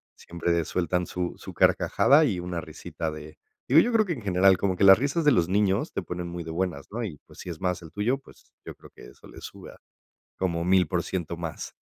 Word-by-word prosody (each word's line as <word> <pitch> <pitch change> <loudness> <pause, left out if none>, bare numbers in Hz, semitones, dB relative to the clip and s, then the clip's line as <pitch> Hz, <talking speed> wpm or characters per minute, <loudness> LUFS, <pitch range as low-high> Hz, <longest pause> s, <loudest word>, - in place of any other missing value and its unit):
siempre 85 0 -2
sueltan 90 +2 -1
su 90 -1 -3
su - - -10
carcajada 145 +3 +4
y 105 -12 0
una 90 -1 -4
risita 80 0 -6
de 75 0 -10 0.3
digo, 140 +5 +6
yo 240 +8 +2
creo 220 -1 +4
que 185 - -4
en 140 -8 -4
general, 95 -1 +4
como 95 -1 0
que 90 - -1
las 95 0 +9
risas 145 +5 0
de 150 - +5
los 85 -9 +2
niños, 100 0 0
te - - -2
ponen 90 0 -6
muy 85 0 -6
de 80 - -7
buenas, 85 -4 -3
¿no?, 115 +3 -4
y 85 -8 -7
pues, - - -17
si - - -8
es 80 -3 -7
más 90 -1 -1
el 80 -2 -12
tuyo, 115 +6 0
pues, 135 - -20
yo - - -8
creo - - -16
que - - -14
eso - - -18
le - - -12
sube - - -10
a - - -17 0.6
como 85 -3 -1
1000% 90 -1 0
más. 85 -2 -6
90 Hz, 235 wpm, -26 LUFS, 85-100 Hz, 0.6 s, las